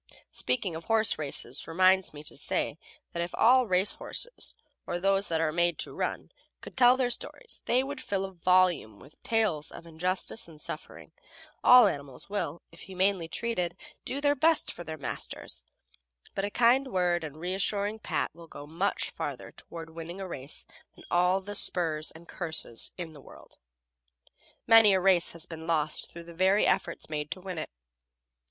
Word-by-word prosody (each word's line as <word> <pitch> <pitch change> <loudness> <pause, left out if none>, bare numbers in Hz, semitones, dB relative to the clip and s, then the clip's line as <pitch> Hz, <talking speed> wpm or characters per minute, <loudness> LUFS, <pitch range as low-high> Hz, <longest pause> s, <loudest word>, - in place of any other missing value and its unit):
Speaking 200 -9 -1
of 165 - -7
horse 225 -5 +3
races 140 -3 -2
reminds 185 +3 +3
me 150 0 -10
to - - -5
say - - -2 0.3
that 170 - -2
if 170 +1 -4
all 250 +1 +5
race 185 +1 +3
horses, - - -5 0.3
or 175 - -2
those 195 +2 +2
that 165 -1 0
are 160 -1 +1
made 170 0 +1
to - - -4
run, - - -3 0.3
could - - -11
tell 250 0 +6
their 250 -2 +1
stories 470 - -4
they 250 +2 +3
would 285 +2 -6
fill 195 -1 -2
volumes 180 - +2
with 140 +3 -17
tales 210 -10 +1
of 170 - -11
injustice 180 +6 -2
and 160 -2 -14
suffering. - - -7 0.5
All 250 -1 +9
animals 140 -3 -4
will, 170 -6 -3
if 165 - -16
humanely 190 0 0
treated, 180 -4 -2 0.3
do 270 - -3
their 285 0 +3
best 315 +3 +2
for 175 - -8
their 160 -2 -6
masters; 140 - -5 0.7
but 195 - -1
a - - -2
kind 245 +5 +4
word 180 -6 +1
and 155 -1 -7
reassuring 200 +5 -1
pat - - -2
will 170 +1 -13
go 145 - -10
much 170 +7 -1
further - - -5
toward 165 -1 -10
winning 165 +3 -8
a 190 - -5
race 140 -4 -7 0.3
than - - -15
all 180 +2 +3
the 205 +2 -7
spurs 165 -6 +3
and 170 +1 -13
curses 160 -9 0
in 170 -3 -5
the 145 - -13
world. - - -15 1.1
Many 225 -3 +7
a - - +3
race 185 -2 +3
has 165 -1 -5
been 160 -1 -9
lost 155 -2 0
through 170 - -9
the 170 0 -12
very 190 +4 +3
efforts 170 - 0
made 150 -1 -4
to - - -5
win 185 -3 -5
it. 155 - -5
180 Hz, 175 wpm, -29 LUFS, 160-205 Hz, 1.1 s, All